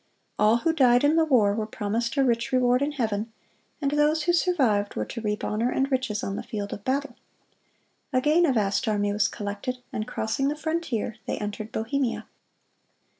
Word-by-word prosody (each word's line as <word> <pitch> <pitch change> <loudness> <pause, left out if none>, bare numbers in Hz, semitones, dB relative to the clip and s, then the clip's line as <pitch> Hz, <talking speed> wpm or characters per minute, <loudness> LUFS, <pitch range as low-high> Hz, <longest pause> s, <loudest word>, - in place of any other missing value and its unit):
All 215 +2 +5
who 320 +7 +1
died 250 -5 +4
in 295 +2 +4
the 325 -1 +4
war 225 -9 +4
were 215 0 -2
promised 225 +4 -2
a 275 - +4
rich 235 -2 0
reward 250 0 +3
in 290 +1 0
heaven, 220 -4 -2 0.5
and 280 -2 0
those 300 +1 +2
who 345 - +2
survived 260 - +1
were 105 - -1
to 230 - -6
reap 210 -1 -2
honor 225 +3 0
and 270 +2 0
riches 255 -5 -1
on 195 0 -3
the - - -3
field 205 -2 -5
of 200 - -8
battle. 270 0 -1 1.0
Again 300 +6 +3
a 270 - +2
vast 210 +2 0
army 205 -1 +1
was 210 +1 +2
collected, 205 +5 -4 0.2
and 215 - -3
crossing 270 +5 -1
the 290 - 0
frontier 305 -9 -2
they - - -2
entered 210 +1 -5
Bohemia. 240 +2 -1
240 Hz, 185 wpm, -26 LUFS, 210-280 Hz, 1.0 s, All